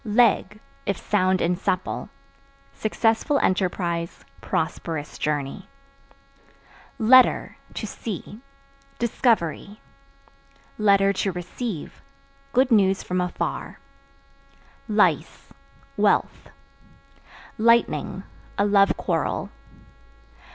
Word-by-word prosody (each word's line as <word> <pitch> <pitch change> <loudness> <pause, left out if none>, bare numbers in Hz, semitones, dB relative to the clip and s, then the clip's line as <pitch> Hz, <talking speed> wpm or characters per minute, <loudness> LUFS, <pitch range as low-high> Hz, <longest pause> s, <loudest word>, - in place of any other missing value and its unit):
Leg 215 -2 +2 0.3
(If 200 -2 0
sound 185 -2 +1
and 175 +1 0
supple) 185 -1 -2 0.6
successful 225 +6 +1
enterprise, 175 -4 -1 0.2
prosperous 155 -3 -3
journey. 150 +4 -3 1.3
Letter 255 +2 +5 0.2
(To - - -4
see) 215 +1 -7 0.6
discovery; 215 -4 0 1.1
(to 195 0 +3
receive) 180 +1 -6 0.5
good 260 0 +2
news 195 -3 +3
from 180 0 -1
afar. 180 0 -4 1.1
Lice - - +1 0.4
Wealth. - - +1 1.1
Lightning 230 +1 +2 0.3
A 200 - +3
love 200 -1 +4
quarrel. - - -2
200 Hz, 75 wpm, -24 LUFS, 180-225 Hz, 1.3 s, Letter